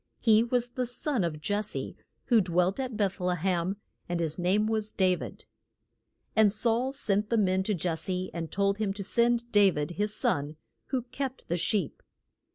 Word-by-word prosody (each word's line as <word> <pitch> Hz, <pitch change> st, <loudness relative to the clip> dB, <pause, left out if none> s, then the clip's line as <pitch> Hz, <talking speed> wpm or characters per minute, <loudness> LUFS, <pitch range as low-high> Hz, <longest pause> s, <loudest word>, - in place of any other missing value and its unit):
He 220 Hz, -1 st, +5 dB
was 245 Hz, 0 st, 0 dB
the 250 Hz, 0 st, -2 dB
son 245 Hz, -2 st, -1 dB
of 160 Hz, -3 st, -2 dB
Jes 210 Hz, +1 st, 0 dB
se, -, -, -4 dB, 0.3 s
who 235 Hz, -4 st, +5 dB
dwelt 180 Hz, +3 st, +1 dB
at 255 Hz, -4 st, -3 dB
Beth 200 Hz, -2 st, 0 dB
le 180 Hz, 0 st, 0 dB
hem, 180 Hz, +2 st, 0 dB, 0.3 s
and 175 Hz, -1 st, -1 dB
his 160 Hz, 0 st, -1 dB
name 190 Hz, +4 st, +2 dB
was 215 Hz, -1 st, -1 dB
Da 185 Hz, -1 st, +3 dB
vid. -, -, -9 dB, 0.9 s
And 220 Hz, -2 st, +5 dB
Saul 235 Hz, +4 st, 0 dB
sent 210 Hz, -6 st, 0 dB
men 190 Hz, -5 st, +3 dB
to 205 Hz, +2 st, 0 dB
Jes 165 Hz, -1 st, -2 dB
se 185 Hz, 0 st, -3 dB
and 165 Hz, -2 st, -5 dB
told 200 Hz, +1 st, +1 dB
him 205 Hz, -3 st, 0 dB
to 200 Hz, 0 st, -5 dB
send 235 Hz, +3 st, +1 dB
Da 205 Hz, -2 st, +6 dB
vid, 150 Hz, -2 st, -3 dB
his 205 Hz, +4 st, -1 dB
son, 145 Hz, +2 st, 0 dB, 0.3 s
who 260 Hz, -3 st, -1 dB
kept 260 Hz, +1 st, -5 dB
the 175 Hz, -, +1 dB
sheep. 185 Hz, -2 st, -1 dB
205 Hz, 185 wpm, -29 LUFS, 180-230 Hz, 0.9 s, Da